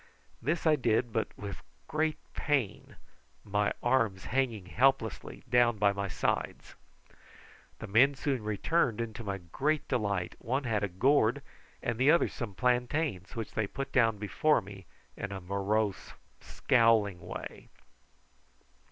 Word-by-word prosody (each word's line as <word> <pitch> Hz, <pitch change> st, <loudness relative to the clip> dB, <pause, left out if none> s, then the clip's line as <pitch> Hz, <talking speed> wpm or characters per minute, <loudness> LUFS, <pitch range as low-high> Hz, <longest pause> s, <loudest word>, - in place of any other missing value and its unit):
This 155 Hz, +8 st, -1 dB
I 155 Hz, -1 st, +5 dB
did, 115 Hz, -2 st, +1 dB
but 110 Hz, -, 0 dB
with 100 Hz, -1 st, -7 dB, 0.3 s
great 155 Hz, 0 st, 0 dB, 0.2 s
pain, 135 Hz, -9 st, -1 dB, 0.5 s
my 105 Hz, 0 st, +1 dB
arms 115 Hz, -7 st, +1 dB
hanging 120 Hz, -7 st, -1 dB
helplessly 120 Hz, +3 st, 0 dB
down 120 Hz, -2 st, +3 dB
by 100 Hz, 0 st, +3 dB
my 100 Hz, 0 st, -3 dB
sides. -, -, -2 dB, 1.0 s
The -, -, -7 dB
men 130 Hz, +8 st, +4 dB
soon 135 Hz, -4 st, -2 dB
returned, 110 Hz, -, 0 dB
and 115 Hz, -1 st, -3 dB
to 115 Hz, -, -6 dB
my 100 Hz, -2 st, -3 dB
great 135 Hz, -, -1 dB
delight 100 Hz, -8 st, -1 dB
one 130 Hz, +4 st, -1 dB
had 110 Hz, -5 st, 0 dB
a -, -, +1 dB
gourd 125 Hz, +6 st, +2 dB, 0.4 s
and 120 Hz, -3 st, -2 dB
the 130 Hz, +3 st, +4 dB
other 170 Hz, +3 st, +4 dB
some 110 Hz, -6 st, -6 dB
plantains, 125 Hz, -, 0 dB
which 115 Hz, -2 st, -4 dB
they 110 Hz, -2 st, -1 dB
put 135 Hz, +6 st, -5 dB
down 115 Hz, -4 st, +3 dB
before 105 Hz, +10 st, +2 dB
me 95 Hz, -2 st, -11 dB, 0.3 s
in 100 Hz, -, -5 dB
a 100 Hz, -, -4 dB
morose, 100 Hz, +2 st, -1 dB, 0.3 s
scowling 115 Hz, -6 st, +2 dB
way. -, -, -8 dB
115 Hz, 140 wpm, -30 LUFS, 100-130 Hz, 1.0 s, I